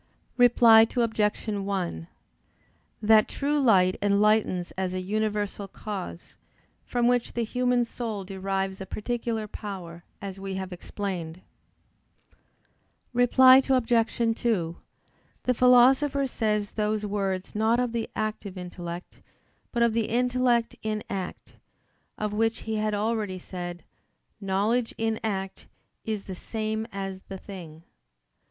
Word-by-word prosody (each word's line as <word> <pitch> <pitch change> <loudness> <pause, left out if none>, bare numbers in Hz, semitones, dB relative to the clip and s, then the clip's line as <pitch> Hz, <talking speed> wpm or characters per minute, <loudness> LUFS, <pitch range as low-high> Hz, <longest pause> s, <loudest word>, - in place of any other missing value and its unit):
Reply 235 -2 +7
Obj. 220 -2 +1
1: 195 - -2 1.0
That 215 0 +6
true 290 +1 -1
light 190 -8 +4
enlightens 205 -3 +2
as 185 -1 -3
a - - -1
universal 205 +1 -2
cause, 195 -3 -7 0.5
from 240 -1 +1
which 245 -1 +1
the 235 - -1
human 250 +1 +1
soul 225 -4 -4
derives 195 0 -3
a 190 - -6
particular 230 +1 -3
power, 180 -5 -7 0.2
as 195 -1 -7
we 195 0 -5
have 190 -1 -5
explained. 180 -2 -5 1.7
Reply 255 +2 +7
Obj. 235 -3 +2 0.2
2: 175 -8 0 0.7
The 250 - +2
Philosopher 260 +3 +5
says 210 -5 -1
those 210 0 -1
words 195 -2 -2
not 220 +3 +2
of 250 -1 0
the 230 -1 -3
active 215 -3 -3
intellect, 175 -1 -7 0.5
but 235 -1 +2
of 235 -1 +3
the 225 -1 0
intellect 245 0 +1
in 215 -1 -2
act: 190 -2 -6 0.6
of 210 -1 -2
which 225 +1 0
he 220 -1 -3
had 215 0 0
already 210 -2 -1
said: 175 -2 -7 0.6
"Knowledge 210 +5 0
in 225 -1 -1
act 195 -3 -3 0.4
is 215 -3 -2
the 190 - -7
same 220 +3 -3
as 195 -1 -5
the 195 - -5
thing." 170 -5 -10
210 Hz, 120 wpm, -27 LUFS, 190-230 Hz, 1.7 s, Reply